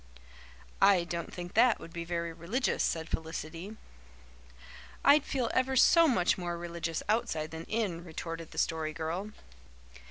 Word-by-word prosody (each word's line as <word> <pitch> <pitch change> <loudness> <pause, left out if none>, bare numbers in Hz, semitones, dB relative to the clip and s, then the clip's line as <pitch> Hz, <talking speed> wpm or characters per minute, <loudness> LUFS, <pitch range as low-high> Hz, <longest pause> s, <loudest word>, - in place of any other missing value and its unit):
"I 195 -3 +6
don't 170 -1 -5
think 175 0 -7
that 235 +1 +5
would 165 - -11
be 170 -1 -4
very 170 -1 -3
religious," 190 +12 -1
said 160 -1 0
Felicity. 165 +6 -5 1.3
"I'd 285 +1 +7
feel 255 -5 -1
ever 260 +1 +1
so 330 +5 +6
much 195 - +2
more 175 -1 -3
religious 170 -1 -4
outside 210 -8 0
than 160 +1 -7
in," 200 -7 -2
retorted 165 -1 -6
the - - -13
Story 160 -1 0
Girl. 170 +5 -3
175 Hz, 140 wpm, -31 LUFS, 165-220 Hz, 1.3 s, I'd